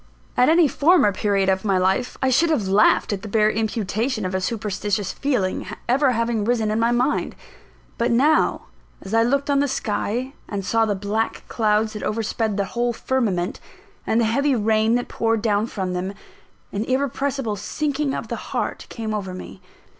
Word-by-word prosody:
At 250 - +4
any 330 0 +5
former 290 - +4
period 200 -1 0
of 190 0 +1
my 195 -3 +2
life, 190 +7 0
I 260 - +3
should 325 +6 +3
have 240 -12 +1
laughed 205 +2 +3
at 195 - -4
the 215 - -7
bare 215 0 +3
imputation 220 +1 -1
of 185 - -3
a 190 - 0
"superstitious" 205 -1 -2
feeling 245 -13 -1 0.2
ever 260 +2 +3
having 230 -2 0
risen 225 -1 +1
in 215 - 0
my 230 +1 +3
mind. 250 +4 0 0.6
But 235 +1 +2
now, 280 +7 +3 0.4
as 195 - -7
I 225 - +5
looked 275 +4 +1
on 280 - +3
the 285 - +2
sky, 250 0 -2 0.2
and 200 -2 -4
saw 225 +2 +2
the 205 -2 0
black 210 +3 -2
clouds 215 -1 +1
that 210 - -6
overspread 220 -1 -1
the 200 - +1
whole 240 0 0
firmament, 215 -9 -1 0.5
and 220 - +2
the 230 - +3
heavy 275 +5 +2
rain 220 +1 +2
that 245 - -1
poured 225 -1 0
down 210 0 +1
from 190 -5 -3
them, 185 +2 -3 0.6
an 200 - -2
irrepressible 270 -2 -1
sinking 290 +6 -2
of - - -5
the - - -4
heart - - -3
came 220 -2 -4
over 190 -3 -4
me. 185 - -10
225 Hz, 185 wpm, -22 LUFS, 205-250 Hz, 0.6 s, any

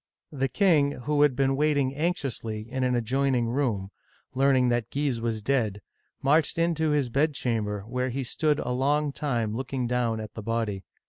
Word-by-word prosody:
The 135 -2 0
king, 150 - +3
who 145 +2 +1
had 145 -3 +4
been 135 +1 +2
waiting 145 -2 +1
anxiously 135 -9 -2
in 130 +2 -2
an 125 -1 +2
adjoin 130 +3 +1
ing 120 -2 +1
room, 115 -7 -1 0.4
learning 130 -1 +3
that 120 -1 0
Guise 135 -5 -1
was 115 -2 -2
dead, 110 -7 0 0.4
marched 150 +3 +3
into 165 -2 +1
his 145 -4 +1
bedchamber, 115 -7 0
where 125 +5 -2
he 135 +2 -3
stood 150 +4 0
a 125 - -3
long 145 +3 +1
time 120 -7 -2
looking 130 0 -3
down 120 -2 0
at 110 -2 -7
the 110 - -6
body. 110 -4 -2
130 Hz, 175 wpm, -27 LUFS, 115-145 Hz, 0.4 s, had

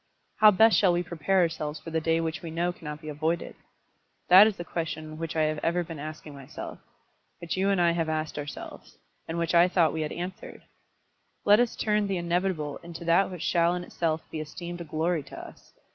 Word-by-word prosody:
How 215 - +8
best 220 +2 +5
shall 185 -4 +4
we 175 +1 0
prepare 175 +3 +1
ourselves 160 -2 -2
for 165 - -9
the 160 0 0
day 165 +1 +1
which 165 -1 -3
we 170 - -6
know 170 +2 -1
cannot 150 -3 -8
be 155 - -7
avoided? 160 +3 -2 0.7
That 190 +4 +9
is 215 - -2
the 175 - -6
question 155 -2 -5
which 165 -1 -4
I 160 - +2
have 155 0 0
ever 170 +3 0
been 165 -3 -8
asking 155 0 -8
myself, 135 -2 -9 0.6
which 170 -1 -4
you 190 +1 +1
and 195 -2 +2
I 170 -1 +4
have 165 -1 -1
asked 155 -1 -2
ourselves, 145 0 -9 0.3
and 165 - -4
which 170 0 -1
I 170 +1 +6
thought 175 -3 +2
we 160 - -2
had 150 - -3
answered. 180 +2 -7 0.8
Let 205 +2 +6
us 245 -1 +1
turn 210 -1 +1
the 195 -1 -1
inevitable 170 -3 -1
into 170 0 -10
that 170 +4 +3
which 180 -3 -7
shall 170 0 +2
in 180 - -4
itself 165 -2 -2
be 160 - -4
esteemed 170 +3 -7
a - - -6
glory 160 +2 -1
to 135 - -12
us. - - -12
170 Hz, 215 wpm, -27 LUFS, 155-180 Hz, 0.8 s, That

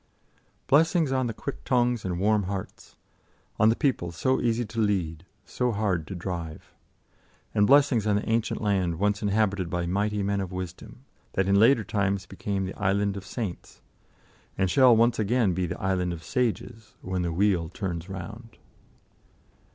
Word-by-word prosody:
Blessings 160 0 +3
on 130 -2 +1
the 115 - -3
quick 140 - -6
tongues 120 -3 +1
and 90 -2 -3
warm 105 0 +2
hearts, 95 0 -7 0.6
on 110 - +6
the 115 - +3
people 120 - 0
so 130 +10 0
easy 120 0 0
to 110 +2 -6
lead, 90 -5 -1 0.2
so 125 -1 -1
hard 100 -7 -1
to 95 - -6
drive. 85 -3 -6 0.8
And 105 -1 +3
blessings 135 -6 +4
on 105 - +3
the 105 - -2
ancient 115 0 0
land 95 -5 +1
once 105 +2 0
inhabited 100 -3 0
by 90 0 -2
mighty 100 +3 -1
men 100 0 0
of 95 -1 -5
wisdom, 90 -1 -8 0.3
that 95 0 +1
in 100 - +3
later 115 +1 +5
times 100 -1 -1
became 95 0 -3
the 95 - -5
Island 100 0 0
of 100 -1 -8
Saints, 105 -4 -6 0.7
and 95 -2 +1
shall 130 0 +6
once 115 +1 +3
again 110 -2 +2
be 90 0 -1
the 85 - -5
Island 90 -2 0
of 80 -1 -8
Sages, 115 +1 -3
when 95 -1 -2
the 85 -1 -1
Wheel 90 -2 +1
turns 90 -2 -5
round. 105 +5 -8
100 Hz, 165 wpm, -26 LUFS, 90-115 Hz, 0.8 s, on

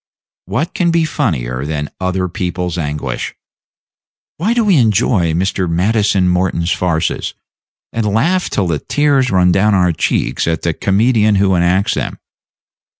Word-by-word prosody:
What 165 +5 -2
can 175 -2 +1
be 165 -1 +2
funnier 65 - -2
than 75 0 -4
other 95 0 -1
people's 90 0 -3
anguish? 75 -6 -4 1.0
Why 215 +9 0
do 235 -2 +2
we 200 -4 +4
enjoy 105 - +2
Mr. 95 +1 -1
Maddison 100 +2 +1
Morton's 90 -1 0
farces, 85 -3 -1 0.6
and 115 -2 -1
laugh 175 - +1
till 100 - 0
the 80 -4 -1
tears 145 -3 +1
run 90 -1 +3
down 100 +3 +3
our 90 -2 +3
cheeks 80 - -1
at 80 -1 -1
the 85 - 0
comedian 105 +3 +2
who 95 -1 +2
enacts 90 +2 +2
them? - - -3
95 Hz, 145 wpm, -16 LUFS, 85-115 Hz, 1.0 s, we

